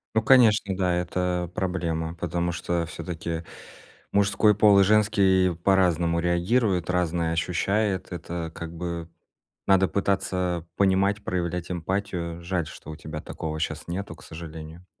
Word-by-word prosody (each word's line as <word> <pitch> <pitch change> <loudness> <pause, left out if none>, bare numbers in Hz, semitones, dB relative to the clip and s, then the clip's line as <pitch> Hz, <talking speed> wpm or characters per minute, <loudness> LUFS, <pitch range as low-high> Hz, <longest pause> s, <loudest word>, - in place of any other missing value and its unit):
Ну, 110 - +4
конечно, 110 -6 +5
да, 90 -2 +1
это 90 0 -1
проблема. 85 -4 -2
Потому 85 +1 -2
что 85 -1 -2
всё-таки 85 0 -5 0.7
мужской 100 +1 +4
пол 105 -1 +6
и - - +7
женский 95 -4 +3
по-разному 85 -3 +3
реагируют, 90 +2 +1
разное 85 -2 0
ощущает. 95 +4 0
Это, 85 -2 -5
как 85 0 -7
бы, 85 -1 -5 0.6
надо 95 -1 +5
пытаться 90 -3 -1
понимать, 100 +1 +2
проявлять 90 -1 -2
эмпатию. 90 -1 -3
Жаль, 85 -2 -2
что 80 - -10
у - - -7
тебя 75 0 -7
такого 80 0 -5
щас - - -3
нету, 90 -1 -4
к - - -16
сожалению. 80 +1 -9
90 Hz, 130 wpm, -25 LUFS, 85-95 Hz, 0.7 s, и